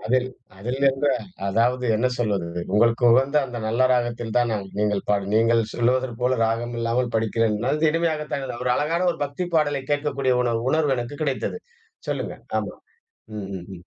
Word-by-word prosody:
அதில் 130 Hz, +2 st, +2 dB, 0.3 s
அதில் 125 Hz, +6 st, -3 dB
இருந்து 135 Hz, +1 st, +2 dB, 0.4 s
அதாவது 120 Hz, +5 st, +1 dB
என்ன 125 Hz, +3 st, +1 dB
சொல்வது. 100 Hz, -7 st, -1 dB, 0.2 s
உங்களுக்கு 115 Hz, +3 st, +3 dB
உகந்த 135 Hz, +4 st, +3 dB
அந்த 120 Hz, -2 st, -6 dB
நல்ல 120 Hz, +4 st, +3 dB
ராகத்தில் 120 Hz, -2 st, -1 dB
தான் 120 Hz, -1 st, +3 dB, 0.3 s
நீங்க. 105 Hz, -1 st, +1 dB, 0.2 s
நீங்கள் 115 Hz, 0 st, +3 dB
சொல்வது 125 Hz, +2 st, +2 dB
போல 125 Hz, 0 st, +1 dB
"ராகம் 115 Hz, +2 st, -1 dB
இல்லாமல் 120 Hz, +1 st, 0 dB
படிக்கிறேன்." 110 Hz, -1 st, +1 dB
அது 155 Hz, +1 st, +2 dB
இனிமையாகத்தான் 155 Hz, -4 st, -1 dB
இருந்த. 125 Hz, -3 st, -5 dB
ஒரு 125 Hz, -, +3 dB
அழகான 170 Hz, +4 st, 0 dB
ஒரு -, -, -11 dB
பக்தி 145 Hz, +6 st, -4 dB
பாடலைக் 145 Hz, -2 st, 0 dB
கேட்கக்கூடிய 140 Hz, -3 st, +1 dB
ஒரு 120 Hz, -1 st, 0 dB, 0.2 s
உணர்வு 150 Hz, -4 st, +2 dB
எனக்கு 120 Hz, +5 st, -5 dB
கிடைத்தது. 140 Hz, -, -2 dB, 0.5 s
சொல்லுங்கள். -, -, -4 dB, 0.2 s
ஆமா. -, -, -4 dB, 0.6 s
ம். 100 Hz, -, -5 dB
ம் 90 Hz, -, -10 dB
ம். 85 Hz, -, -15 dB
125 Hz, 160 wpm, -23 LUFS, 115-140 Hz, 0.6 s, உங்களுக்கு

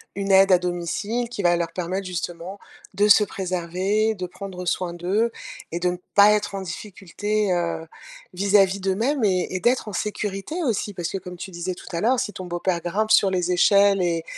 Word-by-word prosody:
une 195 Hz, 0 st, -2 dB
aide 195 Hz, 0 st, +6 dB
à 180 Hz, -, +6 dB
domicile 180 Hz, +7 st, -2 dB
qui 235 Hz, -, -5 dB
va 175 Hz, 0 st, +4 dB
leur 170 Hz, -1 st, -2 dB
permettre, 185 Hz, +2 st, -3 dB
justement, 175 Hz, +2 st, -5 dB, 0.3 s
de 205 Hz, +1 st, +3 dB
se 210 Hz, +1 st, +7 dB
préserver, 190 Hz, +3 st, -1 dB
de 180 Hz, -2 st, -5 dB
prendre 180 Hz, 0 st, -8 dB
soin 175 Hz, 0 st, -1 dB
d'eux 200 Hz, +7 st, 0 dB, 0.4 s
et 170 Hz, -, -3 dB
de 180 Hz, +1 st, +1 dB
ne 180 Hz, -, -3 dB, 0.2 s
pas 205 Hz, +1 st, +8 dB
être 210 Hz, -1 st, -1 dB
en 195 Hz, -, -3 dB
difficulté, 205 Hz, +2 st, -3 dB
heu, 170 Hz, -2 st, -2 dB, 0.5 s
vis-à-vis 200 Hz, 0 st, +3 dB
d'eux-mêmes 225 Hz, +8 st, 0 dB
et 185 Hz, -3 st, +2 dB
et -, -, 0 dB
d'être 240 Hz, 0 st, +1 dB
en 205 Hz, -, -6 dB
sécurité, 210 Hz, -, -3 dB
aussi. 215 Hz, -6 st, -1 dB
Parce 175 Hz, -2 st, -4 dB
que, -, -, -3 dB
comme 180 Hz, -1 st, -9 dB
tu 190 Hz, -, -7 dB
disais 180 Hz, +1 st, -4 dB
tout -, -, -13 dB
à 170 Hz, -1 st, -3 dB
l'heure, 245 Hz, +3 st, +2 dB
si 210 Hz, -6 st, -3 dB
ton 185 Hz, -2 st, -7 dB
beau-père 175 Hz, 0 st, -2 dB
grimpe 210 Hz, +5 st, -1 dB
sur 195 Hz, -2 st, +5 dB
les 180 Hz, -1 st, 0 dB
échelles 200 Hz, +2 st, +4 dB
et 170 Hz, -2 st, 0 dB
190 Hz, 200 wpm, -23 LUFS, 175-205 Hz, 0.5 s, pas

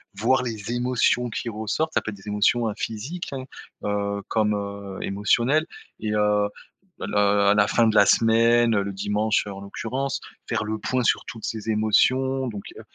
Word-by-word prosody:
voir 125 Hz, +6 st, +2 dB
les 115 Hz, -3 st, -4 dB
émotions 125 Hz, 0 st, +1 dB
qui 115 Hz, -, -4 dB
ressortent, 115 Hz, +9 st, -2 dB
ça -, -, +2 dB
peut -, -, -5 dB
être 105 Hz, -, -7 dB
des 95 Hz, +2 st, -16 dB
émotions, 105 Hz, +3 st, +2 dB
heu, 110 Hz, -, -2 dB
physiques, 130 Hz, +11 st, -5 dB
hein, 130 Hz, -1 st, -4 dB, 0.4 s
heu, 100 Hz, 0 st, -2 dB
comme, 105 Hz, -1 st, +1 dB
heu, 100 Hz, -1 st, -6 dB
émotionnelles 120 Hz, +10 st, +1 dB, 0.3 s
et 105 Hz, -1 st, -2 dB
heu, 105 Hz, -1 st, +2 dB, 0.5 s
le -, -, -4 dB
à 100 Hz, 0 st, +4 dB
la 105 Hz, -1 st, +4 dB
fin 115 Hz, +2 st, +3 dB
de 110 Hz, -, +1 dB
la -, -, +7 dB
semaine, 115 Hz, +1 st, +4 dB
le 100 Hz, 0 st, -3 dB
dimanche, 105 Hz, +3 st, 0 dB
heu, -, -, -5 dB
en 95 Hz, -, -9 dB
l'occurrence, 130 Hz, +7 st, -3 dB, 0.3 s
faire -, -, 0 dB
le 110 Hz, 0 st, -3 dB
point 130 Hz, +2 st, -1 dB
sur -, -, +2 dB
toutes 115 Hz, -, -7 dB
ces 110 Hz, 0 st, -4 dB
émotions. 130 Hz, +5 st, +2 dB
Donc, 105 Hz, -4 st, -6 dB, 0.2 s
heu, -, -, -8 dB
110 Hz, 185 wpm, -24 LUFS, 105-120 Hz, 0.5 s, la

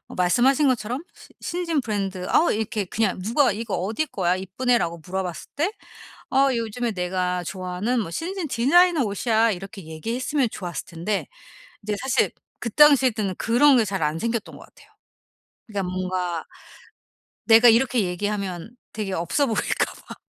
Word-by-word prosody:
어 -, -, -11 dB
말씀하신 250 Hz, -, +3 dB
것처럼 250 Hz, +3 st, -1 dB
시 -, -, -15 dB
신진 335 Hz, -4 st, -1 dB
브랜드 195 Hz, -5 st, -3 dB
어 335 Hz, -, +4 dB
이렇게 215 Hz, -1 st, -2 dB
그냥 190 Hz, 0 st, -1 dB
누가 245 Hz, +6 st, +3 dB
"이거 220 Hz, 0 st, -4 dB
어디 215 Hz, -, -1 dB
거야? 185 Hz, -, 0 dB
이쁘네."라고 190 Hz, -2 st, 0 dB
물어봤을 180 Hz, -1 st, -4 dB
때 335 Hz, +8 st, 0 dB, 0.6 s
"어. 275 Hz, 0 st, +4 dB
요즘에 230 Hz, +1 st, -2 dB
내가 180 Hz, -1 st, -1 dB
좋아하는 190 Hz, +7 st, -2 dB
뭐 165 Hz, -, -5 dB
신진 350 Hz, -, -3 dB
디자이너 310 Hz, +5 st, +4 dB
옷이야." 220 Hz, +2 st, +1 dB
이렇게 195 Hz, +1 st, -7 dB
얘기했으면 235 Hz, -, -2 dB
좋았을 175 Hz, -2 st, -5 dB
텐데 175 Hz, +5 st, -3 dB, 0.6 s
이제 210 Hz, 0 st, -2 dB
사실 265 Hz, -1 st, +1 dB, 0.3 s
그 235 Hz, -, -3 dB
당시 280 Hz, 0 st, +6 dB
때는 205 Hz, -4 st, -3 dB
그런 265 Hz, +5 st, +4 dB
게 230 Hz, -, +4 dB
잘 195 Hz, -4 st, -2 dB
안 150 Hz, +2 st, -1 dB
생겼던 230 Hz, -2 st, -3 dB
것 -, -, -12 dB
같아요. -, -, -21 dB, 0.8 s
그러니까 200 Hz, -4 st, -3 dB
뭔가 185 Hz, -2 st, -2 dB, 1.0 s
내가 230 Hz, +1 st, +7 dB
이렇게 240 Hz, +1 st, +4 dB
얘기하면 195 Hz, +2 st, -3 dB, 0.2 s
되게 210 Hz, -3 st, -4 dB
없어 180 Hz, -, 0 dB
보일까 220 Hz, -4 st, 0 dB
봐. -, -, -8 dB
215 Hz, 340 characters per minute, -24 LUFS, 185-250 Hz, 1.0 s, 내가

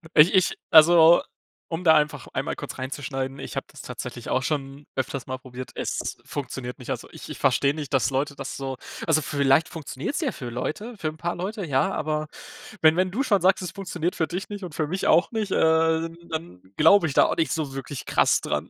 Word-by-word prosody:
Ich 155 Hz, +6 st, +7 dB
ich 185 Hz, -2 st, +3 dB
also, 165 Hz, +1 st, +8 dB, 0.5 s
um 165 Hz, +2 st, -3 dB
da 160 Hz, -2 st, +7 dB
einfach 150 Hz, -1 st, 0 dB
einmal -, -, -2 dB
kurz -, -, -7 dB
reinzuschneiden, 135 Hz, 0 st, -4 dB
ich -, -, -7 dB
habe -, -, -2 dB
das -, -, -11 dB
tatsächlich -, -, -7 dB
auch 130 Hz, -, +1 dB
schon 140 Hz, -1 st, -3 dB
öfters 130 Hz, 0 st, -3 dB
mal 130 Hz, 0 st, -5 dB
probiert. 130 Hz, 0 st, -9 dB
Es -, -, -3 dB
funktioniert 125 Hz, -2 st, -5 dB
nicht. -, -, -7 dB
Also, -, -, -4 dB
ich -, -, -10 dB
ich -, -, -7 dB
verstehe 140 Hz, +1 st, +3 dB
nicht, 150 Hz, -3 st, -6 dB
dass 135 Hz, -, +2 dB
Leute 140 Hz, +2 st, -1 dB
das -, -, -6 dB
so 135 Hz, -1 st, -4 dB, 0.3 s
also 155 Hz, -1 st, +3 dB
vielleicht 140 Hz, +2 st, +2 dB
funktioniert 155 Hz, -, -5 dB
es 355 Hz, -, -2 dB
ja 275 Hz, -, 0 dB
für 125 Hz, -4 st, -7 dB
Leute, 155 Hz, -, -4 dB
für 160 Hz, -, -3 dB
'n 155 Hz, 0 st, -4 dB
paar 175 Hz, +1 st, -2 dB
Leute, 195 Hz, +2 st, -4 dB
ja, 145 Hz, +7 st, +1 dB
aber 155 Hz, -1 st, -2 dB, 0.5 s
wenn 160 Hz, 0 st, +6 dB
wenn 185 Hz, +1 st, +2 dB
du 245 Hz, +9 st, -1 dB
schon 205 Hz, -7 st, +2 dB
sagst, 190 Hz, +1 st, +3 dB
es 180 Hz, -, -4 dB
funktioniert 180 Hz, -3 st, -3 dB
für 160 Hz, -, 0 dB
dich 180 Hz, +4 st, -5 dB
nicht 205 Hz, -2 st, -6 dB
und 170 Hz, -4 st, -7 dB
für 155 Hz, -, 0 dB
mich 185 Hz, +4 st, -2 dB
auch 175 Hz, -, +4 dB
nicht, 215 Hz, -4 st, -2 dB
äh, 160 Hz, 0 st, +3 dB, 0.2 s
dann 160 Hz, -, -6 dB, 0.2 s
glaube 160 Hz, +3 st, +6 dB
ich 140 Hz, -, -4 dB
da -, -, +6 dB
auch -, -, 0 dB
nicht 160 Hz, -, +1 dB
so 150 Hz, -4 st, -2 dB
wirklich 135 Hz, 0 st, -6 dB
krass -, -, +3 dB
dran. -, -, -2 dB
155 Hz, 220 wpm, -25 LUFS, 135-175 Hz, 0.5 s, also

